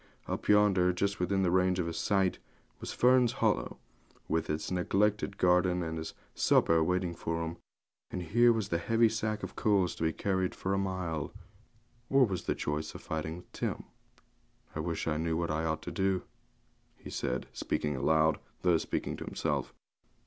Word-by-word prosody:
Up -, -, -4 dB
yonder, 100 Hz, -3 st, +5 dB
just 100 Hz, +3 st, -1 dB
within 95 Hz, +2 st, +1 dB
the 90 Hz, -, +2 dB
range 90 Hz, 0 st, +3 dB
of 90 Hz, -, 0 dB
his 85 Hz, 0 st, -3 dB
sight, 95 Hz, -3 st, +1 dB, 0.4 s
was -, -, -5 dB
Fern's 125 Hz, -1 st, +4 dB
Hollow, -, -, 0 dB, 0.5 s
with 80 Hz, 0 st, -1 dB
its 75 Hz, +2 st, -2 dB
neglected 100 Hz, +2 st, +1 dB
garden, 90 Hz, -1 st, +3 dB
and 80 Hz, -1 st, -3 dB
his 80 Hz, 0 st, -6 dB, 0.2 s
supper 80 Hz, -1 st, +4 dB
waiting 90 Hz, 0 st, 0 dB
for 85 Hz, 0 st, -3 dB
him; 85 Hz, +1 st, -6 dB, 0.5 s
and 90 Hz, -, -4 dB
here 120 Hz, +8 st, +5 dB
was 110 Hz, -3 st, -1 dB
the 85 Hz, -, 0 dB
heavy 115 Hz, +5 st, +3 dB
sack 110 Hz, -1 st, -2 dB
of 95 Hz, +1 st, -6 dB
coals 100 Hz, -4 st, +2 dB
to -, -, -12 dB
be 80 Hz, 0 st, +2 dB
carried 95 Hz, +1 st, -1 dB
for 95 Hz, -, -2 dB
a -, -, +1 dB
mile, 90 Hz, -6 st, -2 dB, 0.8 s
or 135 Hz, -1 st, +5 dB
the 95 Hz, -6 st, -2 dB
choice 75 Hz, +1 st, -3 dB
of -, -, -8 dB
fighting 80 Hz, +1 st, -3 dB
with 90 Hz, -, -14 dB
Tim. -, -, -3 dB, 0.9 s
'I -, -, -3 dB
wish 80 Hz, +1 st, -2 dB
I 75 Hz, -1 st, +1 dB
knew 80 Hz, 0 st, 0 dB
what 85 Hz, -1 st, -1 dB
I 80 Hz, +1 st, -1 dB
ought 80 Hz, 0 st, -2 dB
to 90 Hz, -, -5 dB
do,' 95 Hz, +1 st, 0 dB, 0.7 s
he -, -, -10 dB
said, -, -, -2 dB
speaking 75 Hz, -1 st, -2 dB
aloud, 80 Hz, +3 st, +3 dB, 0.2 s
though 90 Hz, -3 st, +4 dB
speaking -, -, -3 dB
to -, -, -6 dB
himself. -, -, -2 dB
90 Hz, 180 wpm, -31 LUFS, 80-100 Hz, 0.9 s, yonder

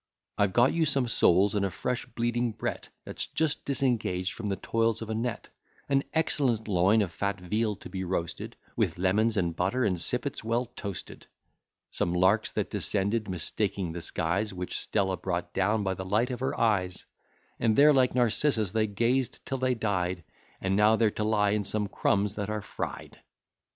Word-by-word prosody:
I've 100 Hz, -1 st, +3 dB
got 120 Hz, +4 st, +4 dB
you 165 Hz, -2 st, +2 dB
some 135 Hz, -4 st, +1 dB
soles, 100 Hz, -3 st, +4 dB
and 100 Hz, -1 st, +1 dB
a 100 Hz, -, +1 dB
fresh 125 Hz, +7 st, -3 dB
bleeding 120 Hz, 0 st, -1 dB
bret, -, -, -4 dB, 0.2 s
That's -, -, -4 dB
just 160 Hz, -2 st, 0 dB
disengaged 115 Hz, -9 st, 0 dB
from 105 Hz, -, -5 dB
the 100 Hz, -, 0 dB
toils 115 Hz, +2 st, 0 dB
of 110 Hz, -, -6 dB
a -, -, 0 dB
net: 115 Hz, +1 st, -3 dB, 0.4 s
An 140 Hz, -1 st, +2 dB
excellent 135 Hz, -8 st, +1 dB
loin 100 Hz, +3 st, +4 dB
of 90 Hz, -, -4 dB
fat 100 Hz, +3 st, -2 dB
veal 105 Hz, +4 st, -1 dB
to -, -, -11 dB
be 95 Hz, +1 st, -4 dB
roasted, 85 Hz, -2 st, -3 dB, 0.2 s
With -, -, 0 dB
lemons, 105 Hz, +5 st, +2 dB
and 85 Hz, -3 st, 0 dB
butter, 100 Hz, +9 st, 0 dB
and 90 Hz, -4 st, 0 dB
sippets 125 Hz, +7 st, -1 dB
well 115 Hz, +2 st, 0 dB
toasted: 100 Hz, -4 st, -7 dB, 0.6 s
Some 85 Hz, +1 st, -1 dB
larks 95 Hz, +5 st, +3 dB
that -, -, -2 dB
descended, 105 Hz, +2 st, 0 dB
mistaking 90 Hz, +1 st, -2 dB
the 85 Hz, +1 st, -5 dB
skies, 90 Hz, +6 st, -1 dB
Which 90 Hz, -1 st, -4 dB
Stella 95 Hz, -2 st, 0 dB
brought 90 Hz, -2 st, -3 dB
down 105 Hz, +3 st, +1 dB
by 95 Hz, -1 st, 0 dB
the 95 Hz, -, -5 dB
light 110 Hz, +7 st, +1 dB
of 125 Hz, -, -4 dB
her 130 Hz, -, -2 dB
eyes; 95 Hz, -5 st, +1 dB, 0.5 s
And 110 Hz, -2 st, +2 dB
there, 150 Hz, +4 st, +7 dB
like 130 Hz, -2 st, +3 dB
Narcissus, 120 Hz, -3 st, +2 dB
they 110 Hz, 0 st, +1 dB
gazed 120 Hz, +5 st, 0 dB
till 135 Hz, -, -3 dB
they 130 Hz, 0 st, +1 dB
died, 90 Hz, -5 st, -1 dB, 0.4 s
And 95 Hz, 0 st, 0 dB
now 105 Hz, +2 st, +5 dB
they're 110 Hz, -1 st, +2 dB
to 105 Hz, -, -3 dB
lie 105 Hz, -2 st, +2 dB
in 105 Hz, 0 st, +1 dB
some 105 Hz, +1 st, -1 dB
crumbs 100 Hz, 0 st, +1 dB
that 105 Hz, -1 st, -3 dB
are 105 Hz, -1 st, -3 dB
fried. -, -, -6 dB
105 Hz, 185 wpm, -28 LUFS, 95-120 Hz, 0.6 s, there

